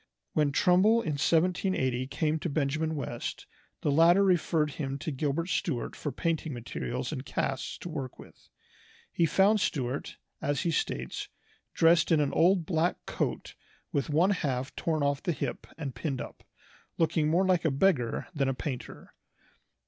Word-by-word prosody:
When 150 -2 +2
Trumbull 195 +9 +4
in 160 - -1
1780 160 -7 +1
came 155 +3 0
to 170 - -3
Benjamin 155 +2 0
West, 120 -5 -5 0.4
the 145 - +1
latter 170 +6 +6
referred 165 -5 +2
him 135 -2 -4
to 155 - -4
Gilbert 145 +4 -1
Stuart 165 - -1
for 145 - -4
painting 160 -2 -2
materials 120 +2 -4
and 130 -4 -4
casts 135 -1 -3
to - - -8
work 140 -6 -5
with. - - -16 0.6
He 170 - +2
found 200 +6 +4
Stuart, 130 -1 -2 0.2
as 145 -1 0
he 170 - 0
states, 65 - -2 0.5
"dressed 165 0 +4
in 160 - +5
an 145 -2 +1
old 175 0 +4
black 165 +1 0
coat - - -3 0.4
with 140 - -1
one 165 +7 +3
half 135 -8 -2
torn 155 -3 0
off 140 0 +1
the 175 - -1
hip - - -4
and 145 -5 -4
pinned 135 -2 -3
up, - - -8 0.5
looking 160 -2 +2
more 175 +4 +3
like 185 -2 +2
a 160 - +3
beggar 135 -5 +1
than 140 -4 +1
a 135 - -1
painter." 130 -2 -6
155 Hz, 160 wpm, -29 LUFS, 135-170 Hz, 0.6 s, latter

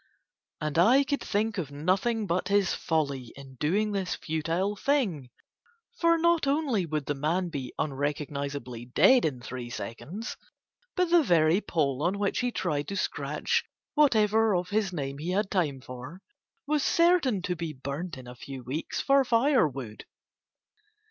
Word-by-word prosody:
And 155 +1 -1
I 245 +10 +6
could 285 +1 -2
think 215 0 -1
of 155 -6 -3
nothing 190 +10 0
but 185 0 -1
his 200 -1 +2
folly 140 -7 -1
in 135 -1 -12
doing 205 +8 +1
this 195 -3 -1
futile 165 +6 -1
thing, 200 - 0 0.7
for 335 -1 +4
not 335 -2 +2
only 275 - +1
would 155 -2 -2
the 145 - -1
man 165 +6 -1
be 135 -5 -5
unrecognizably 140 -3 -3
dead 250 - +5
in 130 -6 -2
three 125 -1 -6
seconds, 175 - -6 0.6
but 360 -2 +1
the 345 -1 +7
very 170 - +3
pole 140 -8 0
on 180 +5 +1
which 200 -1 0
he 245 -1 0
tried 150 -9 -2
to 200 - -4
scratch - - -1 0.3
whatever 220 -7 +4
of 180 0 -1
his 205 -2 0
name 140 -4 -4
he 165 +4 -4
had 200 +1 0
time 150 -9 0
for 130 +9 -9 0.4
was 300 0 +1
certain 330 - +3
to 180 - -1
be 165 -1 -4
burnt 140 +4 -5
in 130 - -10
a 125 - -9
few 130 +1 -9
weeks 135 +7 -4
for 275 0 +4
firewood. 200 - +1
175 Hz, 155 wpm, -28 LUFS, 140-220 Hz, 0.7 s, the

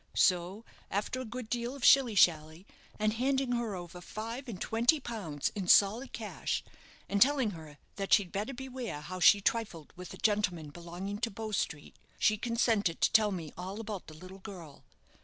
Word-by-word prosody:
So, 185 +4 +2 0.2
after 210 +6 -2
a - - -5
good 240 +1 -6
deal 240 +3 -3
of 275 - -3
shilly 255 -5 +6
shally, 160 -1 +3 0.3
and 215 0 +1
handing 265 +2 0
her 235 -4 -1
over 175 0 -8
five 230 +7 -6
and 195 -6 -6
twenty 240 +10 +2
pounds 195 - -3
in 195 -3 -4
solid 215 +8 +5
cash, - - -3 0.4
and 200 0 -1
telling 265 -4 +4
her 155 -4 -11 0.2
that 195 -1 -4
she'd 190 -4 +4
better 215 +7 -3
beware 250 - -6
how 185 +5 -7
she 200 +2 +7
trifled 200 -8 -2
with 180 0 -9
a - - -14
gentleman 180 -8 0
belonging 175 +5 -6
to 230 +1 -1
Bow 220 +1 -6
Street, 150 -7 -3 0.2
she 215 - +3
consented 220 -5 +1
to - - +4
tell 215 -1 +4
me 165 -5 -5
all 190 +4 -6
about 210 -4 -6
the 155 - -11
little 185 +4 -11
girl. 180 -8 -11
205 Hz, 180 wpm, -31 LUFS, 180-235 Hz, 0.4 s, she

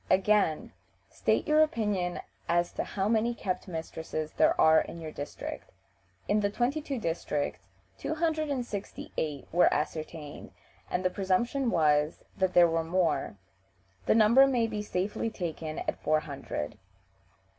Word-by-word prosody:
Again: 190 -4 +2 0.4
"State - - 0
your 305 +1 +5
opinion 205 -11 0 0.3
as 175 0 +2
to - - -3
how 195 0 -2
many 230 +2 +2
kept 185 -4 -3
mistresses 160 -2 -5
there - - +3
are 160 0 +7
in 170 - -7
your 160 -1 -6
district?" 145 -1 -7 0.6
In 210 - +3
the 205 -1 +1
twenty 250 +8 0
two 280 -3 -4
districts 155 - -2 0.3
two 315 - -2
hundred 315 -2 0
and 260 -4 -1
sixty 205 -4 -6
eight 150 -3 -3
(268) - - -26
were - - +6
ascertained, 155 0 -4 0.4
and 185 +1 -1
the 185 - +3
presumption 235 +8 0
was 150 -4 +2
that 190 -1 0
there 175 -1 +8
were 165 0 0
more. 165 - 0 0.7
The - - +5
number 230 +5 +7
may 245 -4 +2
be 215 -2 -3
safely 205 +2 -2
taken 165 -6 -5
at - - -3
four 155 0 +2
hundred. 110 - -5
185 Hz, 155 wpm, -29 LUFS, 160-225 Hz, 0.7 s, there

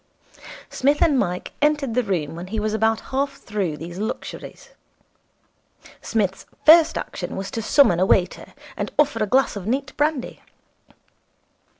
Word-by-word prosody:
Psmith 285 +3 +1
and 295 -6 +3
Mike 180 -4 -2
entered 295 -4 +1
the 250 - +2
room 175 -9 -2
when 175 +2 -7
he 220 +3 -3
was 215 0 -1
about 220 +1 +1
half 275 +1 0
through 195 -8 -3
these 170 +3 -8
luxuries. 215 - -6 1.3
Psmith's 195 -4 -2 0.2
first 325 +1 +7
action - - -5
was 195 0 -5
to 225 - -3
summon 215 - +4
a 185 - +3
waiter, 180 -2 0 0.2
and - - -4
order 290 -7 +2
a - - -1
glass 265 +3 +2
of 200 -1 -6
neat 265 +3 -2
brandy. 295 -3 -1
220 Hz, 150 wpm, -22 LUFS, 190-275 Hz, 1.3 s, first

